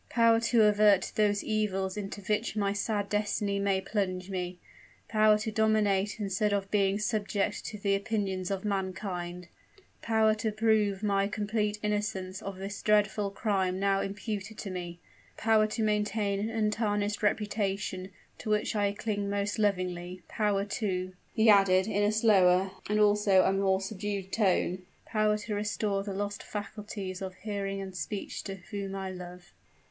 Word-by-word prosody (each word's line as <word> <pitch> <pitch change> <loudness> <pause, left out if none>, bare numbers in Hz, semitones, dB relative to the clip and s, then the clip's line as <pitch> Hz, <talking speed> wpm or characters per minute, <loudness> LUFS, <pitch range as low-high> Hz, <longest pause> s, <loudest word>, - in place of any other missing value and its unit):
_ - - -34
power 230 -1 +4
to 230 -1 +3
avert 210 -2 +4
those 205 -1 +2
evils 195 -3 -1
into 205 -1 -5
which 210 +3 -1
my 200 -2 +1
sad 205 0 -1
destiny 205 -1 0
may 200 -1 +1
plunge 190 -1 -2
me, 180 -1 -3 0.5
power 215 -1 +4
to 220 +1 -3
dominate 210 -2 +2
instead 205 +1 0
of 195 -1 -1
being 200 -1 +2
subject 210 -2 -1
to 215 - -6
the 200 -1 0
opinions 195 -3 -1
of 195 0 -3
mankind, 185 -3 -3 0.5
power 220 -1 +3
to 215 0 -2
prove 215 -2 +1
my 200 -1 +2
complete 210 0 -1
innocence 205 -3 -2
of 195 -1 -6
the 195 +1 -5
dreadful 210 -1 +2
crime 195 -3 0
now 195 0 +2
imputed 205 +1 -4
to 195 - -5
me, 175 -1 -6 0.4
power 220 -1 +3
to 220 +1 -2
maintain 210 -1 0
an 215 +2 -1
untarnished 210 -2 0
reputation, 200 -3 -1 0.3
to - - -5
which 210 +1 +1
I 205 -1 +1
cling 205 -1 -2
most 200 +1 -1
lovingly, 180 -3 -1
power, 205 -2 0
too," 185 -3 -2 0.2
he 220 +1 +2
added 195 -3 +6
in 205 -1 0
a 205 0 +3
slower 195 -4 +4 0.2
and 210 0 +2
also 205 -2 +5
a 190 - +2
more 195 -1 +2
subdued 195 -1 -4
tone 185 -3 +1 0.2
"power 215 -1 +1
to 210 0 -5
restore 205 -1 -1
the 200 -1 -5
lost 205 +1 -3
faculties 205 -2 -6
of 190 -1 -5
hearing 200 -2 -3
and 190 -1 -7
speech 185 +5 -4
to 195 - -4
her 190 - -16
whom 195 -1 -4
I 190 -1 -4
love." 180 0 -10
205 Hz, 160 wpm, -29 LUFS, 195-210 Hz, 0.5 s, added